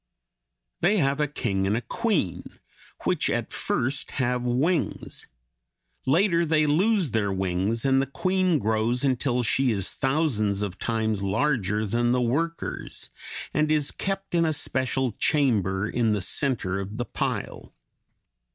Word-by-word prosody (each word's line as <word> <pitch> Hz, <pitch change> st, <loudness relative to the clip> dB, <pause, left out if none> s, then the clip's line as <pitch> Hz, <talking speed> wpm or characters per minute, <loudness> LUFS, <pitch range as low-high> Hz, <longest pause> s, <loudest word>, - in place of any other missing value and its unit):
They 195 Hz, +5 st, +3 dB
have 140 Hz, -4 st, +1 dB
a 150 Hz, -, +2 dB
king 100 Hz, -9 st, -1 dB
and 110 Hz, +3 st, -1 dB
queen, 200 Hz, -, -2 dB, 0.4 s
which -, -, +1 dB
at -, -, -2 dB
first 135 Hz, +4 st, -1 dB
have 125 Hz, -2 st, +1 dB
wings; 135 Hz, +7 st, -1 dB, 0.8 s
later 170 Hz, +4 st, +3 dB
they 155 Hz, -1 st, +2 dB
lose 180 Hz, -, +2 dB
their 105 Hz, -3 st, 0 dB
wings 95 Hz, +5 st, -1 dB
and 135 Hz, 0 st, +4 dB
the 135 Hz, -, -2 dB
queen 185 Hz, +5 st, +1 dB
grows 110 Hz, +2 st, +1 dB
until 125 Hz, -1 st, +1 dB
she 125 Hz, +4 st, +2 dB
is 100 Hz, -4 st, 0 dB
thousands 120 Hz, -9 st, +1 dB
of 95 Hz, -3 st, -5 dB
times 110 Hz, -3 st, -1 dB
larger 105 Hz, -1 st, 0 dB
than 120 Hz, +3 st, +1 dB
the 125 Hz, -, +2 dB
workers, 155 Hz, +8 st, -2 dB, 0.4 s
and 155 Hz, 0 st, +2 dB
is 150 Hz, -2 st, +2 dB
kept 195 Hz, -1 st, -4 dB
in 170 Hz, -1 st, +3 dB
a 160 Hz, -1 st, +1 dB
special 130 Hz, -3 st, 0 dB
chamber 105 Hz, -, +1 dB
in 115 Hz, -1 st, +1 dB
the 105 Hz, -, -1 dB
center 100 Hz, -4 st, 0 dB
of 100 Hz, +2 st, -6 dB
the 120 Hz, -, -2 dB
pile. -, -, -4 dB
125 Hz, 140 wpm, -26 LUFS, 110-150 Hz, 0.8 s, and